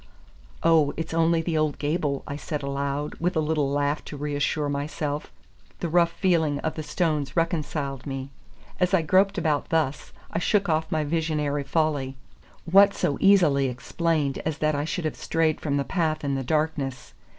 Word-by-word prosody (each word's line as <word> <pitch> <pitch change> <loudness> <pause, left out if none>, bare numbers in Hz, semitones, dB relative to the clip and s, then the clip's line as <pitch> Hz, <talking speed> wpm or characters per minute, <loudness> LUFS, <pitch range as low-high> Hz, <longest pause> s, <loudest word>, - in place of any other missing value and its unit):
"Oh, 160 -3 +4
it's 160 0 -4
only 165 0 +2
the 160 -2 0
old 155 -2 0
gable," 145 -2 -1
I 140 - -5
said 150 0 -4
aloud, 140 +1 -2
with 180 +2 0
a - - +2
little 150 -2 +1
laugh 145 +1 0
to 145 - -7
reassure 145 +1 -1
myself. 145 +1 -3 0.5
The 170 - -2
rough 170 +1 +4
feeling 160 -6 +1
of 160 - -2
the 155 - -5
stones 150 -4 -1
reconciled 150 -6 -1
me. 135 0 -5 0.5
As 180 +1 +3
I 170 - +2
groped 195 +5 +3
about 155 -4 0
thus, 155 -4 -1 0.2
I 165 - -1
shook 200 +3 +2
off 160 -1 0
my 155 -1 +1
visionary 150 -2 -1
folly. 140 -2 0 0.5
What 200 +3 +6
so 140 - -1
easily 165 -9 +5
explained 145 +3 -1
as 155 -1 -3
that 155 0 +1
I 145 0 -1
should 165 +1 -3
have 155 - -2
strayed 160 -1 0
from 145 -2 0
the 140 - +1
path 160 -4 -1
in 140 -1 0
the 135 -1 -1
darkness? 145 -2 -2
155 Hz, 175 wpm, -25 LUFS, 145-165 Hz, 0.5 s, What